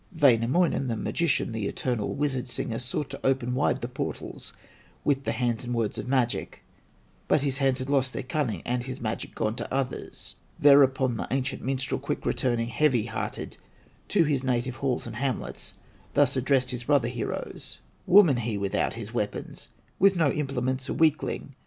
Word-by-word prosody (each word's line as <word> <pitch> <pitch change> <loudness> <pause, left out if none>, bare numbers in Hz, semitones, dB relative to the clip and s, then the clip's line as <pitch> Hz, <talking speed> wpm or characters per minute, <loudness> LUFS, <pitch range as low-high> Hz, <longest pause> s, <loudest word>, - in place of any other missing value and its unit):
Wainamoinen, 135 +3 +4
the 115 -2 -1
magician, 160 -4 0
The 110 -3 -2
eternal 120 -3 -2
wizard 140 -3 -1
singer, 120 -2 -3
Sought 130 +3 -3
to - - -8
open 130 -2 +1
wide 130 +3 +1
the 120 - -2
portals 125 - -5 0.5
With 140 -2 +1
the - - +1
hands 120 -2 -1
and 120 0 -3
words 115 -3 -1
of - - -5
magic; 125 -2 0 0.6
But 150 - +3
his 140 -1 0
hands 135 -2 +3
had 130 0 -4
lost 135 -2 +2
their - - -4
cunning, 130 -3 -2
And 125 0 0
his 130 +1 -6
magic 110 -1 -4
gone 110 -1 0
to - - -5
others. 135 -1 -3 0.2
Thereupon 135 -4 +5
the - - -3
ancient 130 0 -1
minstrel 135 +1 -1
Quick - - -4
returning, 120 -2 0
heavy 125 -4 +2
hearted, 115 - -4 0.5
To 190 -5 +4
his 145 -4 0
native 130 0 -1
halls 130 -3 -1
and 115 -1 -6
hamlets, 120 - -3 0.4
Thus 140 -2 +4
addressed 130 -1 +2
his 125 -1 -4
brother 140 -4 +3
heroes: 120 -2 -5 0.3
"Woman, 175 -9 +7
he 115 -3 -2
without 100 -1 0
his - - -7
weapons, - - -3 0.3
With 195 0 +5
no 155 -5 +3
implements, 130 -2 -2
a - - -1
weakling! 155 -3 +1
130 Hz, 170 wpm, -27 LUFS, 120-140 Hz, 0.6 s, Woman